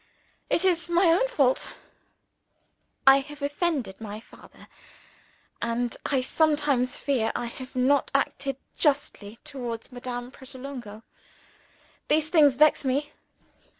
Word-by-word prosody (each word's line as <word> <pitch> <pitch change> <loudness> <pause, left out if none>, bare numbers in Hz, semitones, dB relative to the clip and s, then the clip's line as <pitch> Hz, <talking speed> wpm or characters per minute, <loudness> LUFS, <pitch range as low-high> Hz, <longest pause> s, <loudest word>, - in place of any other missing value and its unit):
It 350 - +2
is 345 -3 +1
my 345 0 +4
own 375 +9 +3
fault. 275 - +1 1.3
I 270 0 +9
have 295 +1 -9
offended 285 - -2
my 210 -1 -6
father; 225 - -17 0.9
and 235 +1 -1
I 265 -3 +1
sometimes 290 -4 +1
fear 255 -6 0
I - - -2
have 255 +2 -9
not 265 +3 +2
acted 275 -1 0 0.2
justly 250 -7 0
towards 245 -6 -6
Madame 245 0 -6
Pratolungo. 260 -5 -9 1.0
These 310 +1 +2
things 295 -6 +5
vex 300 +2 +4
me. 280 +3 -1
270 Hz, 115 wpm, -26 LUFS, 245-295 Hz, 1.3 s, I